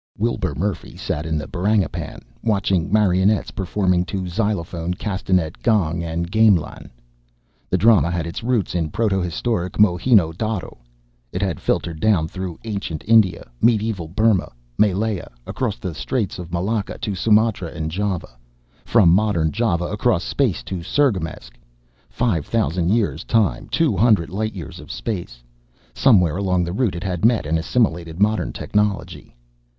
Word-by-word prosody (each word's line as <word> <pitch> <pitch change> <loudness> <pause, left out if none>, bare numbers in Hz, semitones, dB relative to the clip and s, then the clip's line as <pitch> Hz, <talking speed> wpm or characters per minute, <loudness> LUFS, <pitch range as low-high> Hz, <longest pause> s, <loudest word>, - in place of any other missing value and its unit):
Wilbur 100 -8 -1
Murphy 95 +3 -3
sat 75 +2 -3
in 80 -1 -1
the 75 - -4
Barangipan, 95 -4 -1 0.2
watching 100 -4 0
marionettes 100 0 +2
performing 90 -1 0
to 95 -1 -4
xylophone, 90 -3 -2
castanet, 95 -4 -1
gong 85 -8 +1
and 85 +1 -3
gamelan. 110 -6 +2 0.8
The 90 - +2
drama 95 -6 +5
had 85 -1 -2
its 85 - -5
roots 115 -4 0
in 85 -3 -1
proto 100 +1 0
historic 90 +2 -2
Mohenjō 95 -2 +3
Darō. 110 -3 -3 0.6
It 90 - -2
had 95 -7 -2
filtered 85 -3 -1
down 95 -7 +2
through 90 0 -6
ancient 100 -8 -4
India, 110 -5 +4
medieval 110 -6 +1
Burma, 105 +2 +1 0.2
Malaya, 105 - 0 0.2
across - - -2
the 85 +7 -5
Straits 110 +1 -2
of 85 -1 -8
Malacca 100 +4 -2
to 105 -2 -3
Sumatra 105 -1 +2
and 80 -1 -5
Java; 90 -9 -3 0.4
from 105 -7 +4
modern 85 -4 +2
Java 100 -6 0
across 105 -1 0
space 130 -10 0
to 95 - -5
Cirgamesç, 85 - -1 0.6
five 100 -12 -1
thousand 90 -6 0
years 100 - +1
of - - -14
time, 110 -3 +1
two 160 -10 +1
hundred 100 -4 +3
light 110 +2 -2
years 85 -7 -8
of - - -10
space. 85 - -5 0.5
Somewhere 90 - +4
along 90 -3 +1
the 85 0 -3
route 115 -4 0
it 85 - -5
had 90 -3 -3
met 115 -4 +3
and 80 +2 0
assimilated 85 -4 0
modern 105 +1 +1
technology. 105 -9 -2
95 Hz, 145 wpm, -21 LUFS, 85-110 Hz, 0.8 s, drama